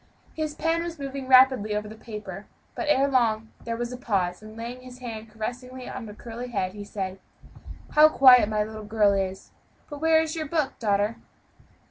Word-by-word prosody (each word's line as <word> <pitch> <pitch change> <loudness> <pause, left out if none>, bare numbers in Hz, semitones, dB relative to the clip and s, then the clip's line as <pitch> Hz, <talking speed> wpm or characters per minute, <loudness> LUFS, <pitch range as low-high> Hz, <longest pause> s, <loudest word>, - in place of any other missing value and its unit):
His 310 -1 -3
pen 330 +1 0
was 340 -1 -5
moving 275 -1 -5
rapidly 255 -5 +5
over 210 0 -2
the 215 - -9
paper, 220 -1 -8 0.3
but 330 - -4
ere 275 -1 +4
long 225 -5 +1 0.2
there 230 0 -3
was 240 +1 -3
a - - -6
pause, 185 -7 -1
and 215 +1 -12
laying 240 +2 -6
his 255 -1 -12
hand 225 -3 -7
caressingly 250 +4 -6
on 245 -4 -6
the 210 - -10
curly 235 +2 -7
head, 190 -6 -2
he 205 0 -7
said, 195 -2 -5 0.7
"How 305 +1 +7
quiet 255 -6 +7
my 215 -1 +1
little 215 0 -8
girl 210 -1 +3
is; 190 -1 -3 0.4
but 290 0 -7
where 320 0 +5
is 320 0 -1
your 310 -2 -3
book, 305 -2 -1
daughter?" 205 0 +1
235 Hz, 190 wpm, -26 LUFS, 210-265 Hz, 0.7 s, How